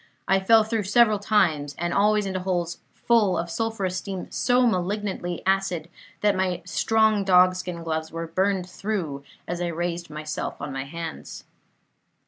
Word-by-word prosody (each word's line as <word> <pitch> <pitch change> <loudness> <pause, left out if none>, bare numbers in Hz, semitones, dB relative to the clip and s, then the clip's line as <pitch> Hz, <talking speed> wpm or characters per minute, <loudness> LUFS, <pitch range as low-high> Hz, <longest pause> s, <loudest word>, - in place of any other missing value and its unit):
I 195 0 +4
fell 220 +3 +5
through 220 -2 -2
several 215 0 +4
times, 160 -9 +1
and 175 0 -2
always 210 +1 +3
into 190 -1 -2
holes 175 -2 -2 0.2
full 220 -6 +2
of 170 0 -3
sulphurous 200 -3 -2
steam 190 0 -6
so 250 0 +2
malignantly 185 -3 -1
acid 190 -4 0 0.3
that 205 -1 +3
my 185 -2 -1
strong 220 +3 +2
dogskin 180 -2 +3
gloves 160 -1 -3
were 165 0 -4
burned 185 +2 0
through 180 -7 -4 0.2
as 175 0 -3
I 175 - 0
raised 170 0 -3
myself 155 +2 -5
on 145 - -5
my 135 0 -4
hands. 165 +2 -7
185 Hz, 150 wpm, -25 LUFS, 170-205 Hz, 0.3 s, fell